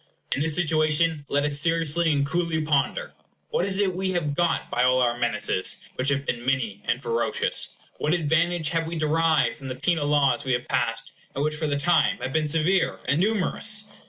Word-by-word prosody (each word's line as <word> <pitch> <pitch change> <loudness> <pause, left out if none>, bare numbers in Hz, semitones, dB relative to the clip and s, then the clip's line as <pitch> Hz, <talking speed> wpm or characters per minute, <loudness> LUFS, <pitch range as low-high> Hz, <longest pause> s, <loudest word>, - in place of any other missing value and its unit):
In 140 - -2
this 155 0 +2
situation, 155 -2 +1
let 145 0 +1
us 145 -1 +1
seriously 165 0 +1
and 140 -1 +1
coolly 170 +1 -1
ponder. 155 - 0 0.4
What 470 - +1
is 190 -1 -1
it 195 -2 +1
we 190 0 -1
have 150 -5 -1
got 170 +2 0
by 120 - 0
all 125 0 +4
our 120 -1 +2
menaces, 105 -5 0 0.2
which 130 +2 -1
have 140 0 -1
been 120 -2 -3
many 125 -6 -1
and 120 - 0
ferocious? 115 -3 -1 0.2
What 155 +4 +1
advantage 165 0 +1
have 165 -1 -1
we 170 - -4
derived 155 -1 +1
from 135 -3 -9
the 130 - -4
penal 145 +2 0
laws 145 -1 +2
we 130 -2 0
have 120 0 -2
passed, 115 -2 -2 0.2
and 140 - -1
which, 155 0 0
for 155 0 -2
the 145 -1 0
time, 175 +6 +2
have 135 -8 -5
been 155 -1 0
severe 165 +5 +1
and 140 +4 +2
numerous? 210 +1 0
155 Hz, 200 wpm, -25 LUFS, 135-170 Hz, 0.4 s, all